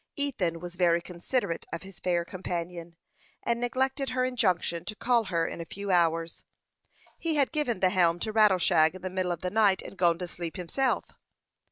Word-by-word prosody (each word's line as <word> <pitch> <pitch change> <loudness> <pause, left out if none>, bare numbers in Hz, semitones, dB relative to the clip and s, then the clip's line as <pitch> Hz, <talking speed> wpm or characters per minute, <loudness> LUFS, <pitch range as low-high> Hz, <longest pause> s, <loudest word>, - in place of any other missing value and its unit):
Ethan 205 - -1
was 175 +1 -8
very 170 -2 +4
considerate 175 +2 -3
of 165 0 -5
his 190 -1 -12
fair 175 -2 0
companion, 175 -2 -5 0.5
and 235 0 0
neglected 265 +3 0
her 255 0 +1
injunction 185 -9 0
to 215 - -5
call 235 0 +2
her 170 -3 0
in - - -5
a - - -6
few 200 +3 -5
hours. 165 -1 +1 0.8
He 330 -2 -1
had 280 -3 +2
given 295 - -1
the 185 -1 +4
helm 170 -2 +3
to 220 - -2
Rattleshag 185 -6 +4
in 185 - -10
the 185 - -3
middle 185 -1 -1
of 170 - -4
the 180 - -2
night, 205 -3 +3
and - - -9
gone 175 -3 +3
to 180 0 -5
sleep 170 -2 -6
himself. 255 +10 0
185 Hz, 190 wpm, -28 LUFS, 170-230 Hz, 0.8 s, very